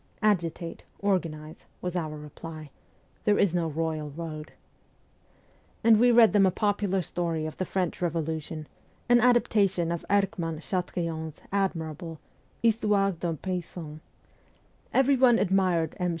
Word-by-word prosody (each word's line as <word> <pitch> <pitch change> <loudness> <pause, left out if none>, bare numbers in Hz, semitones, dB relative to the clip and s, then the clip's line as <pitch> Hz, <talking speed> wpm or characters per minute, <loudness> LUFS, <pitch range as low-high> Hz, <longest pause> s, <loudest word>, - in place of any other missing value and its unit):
' - - -34
Agitate, 170 -2 -5 0.2
organize,' 165 -6 -2
was 180 0 -4
our 155 -3 -2
reply; 155 0 -9 0.3
' - - -36
there 205 -1 +3
is 190 -4 +3
no 170 -2 +1
royal 155 -1 -2
road; 155 0 -7 0.7
' - - -35
and 225 -2 +6
we 245 +1 +6
read 230 -2 +6
them 200 -2 +5
a - - +5
popular 200 -1 0
story 165 -1 -2
of 155 - -5
the 185 - -1
French 180 -1 -2
Revolution, 160 -2 -2 0.4
an 240 0 +5
adaptation 205 -8 +3
of 170 - -3
Erckmann 195 -5 0
Chatrian's 165 -3 -3
admirable 165 -4 -2 0.2
' - - -36
Histoire 210 -3 +3
d'un 170 -2 -3
Paysan.' 170 -3 -5 0.9
Everyone 260 -3 +5
admired 180 -5 +1
M. 180 -1 +1
175 Hz, 135 wpm, -27 LUFS, 160-200 Hz, 0.9 s, and